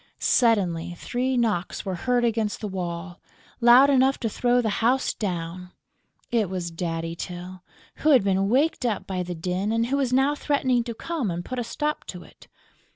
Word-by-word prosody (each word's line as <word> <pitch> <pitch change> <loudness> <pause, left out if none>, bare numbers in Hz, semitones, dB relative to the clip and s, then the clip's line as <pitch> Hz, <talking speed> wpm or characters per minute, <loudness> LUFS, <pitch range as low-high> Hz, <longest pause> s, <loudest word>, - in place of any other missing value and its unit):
Suddenly, 175 - +2
three 255 +5 -1
knocks 215 -7 -1
were 190 - -2
heard 245 +7 +1
against 225 -2 -1
the 215 - -4
wall, 175 -2 -5 0.4
loud 245 +3 +7
enough 265 0 +3
to 225 - 0
throw 245 +3 +2
the 220 -3 -1
house 250 +4 +2
down! 180 -2 -5 0.6
It 225 -6 +1
was 180 -2 -4
Daddy 165 0 -3
Tyl, 180 +1 -7 0.4
who 310 - +1
had 265 -8 +6
been 195 0 +1
waked 275 +5 +2
up 215 -6 -1
by 185 -2 -3
the 180 0 -4
din 180 +5 -2
and 230 +1 +1
who 270 +4 0
was 265 -3 0
now 270 +3 +3
threatening 265 -5 +1
to 235 -2 -5
come 310 - -3
and 175 0 -4
put 255 -1 -4
a - - -1
stop 300 +6 -3
to - - -8
it. - - -18
220 Hz, 185 wpm, -25 LUFS, 180-250 Hz, 0.6 s, loud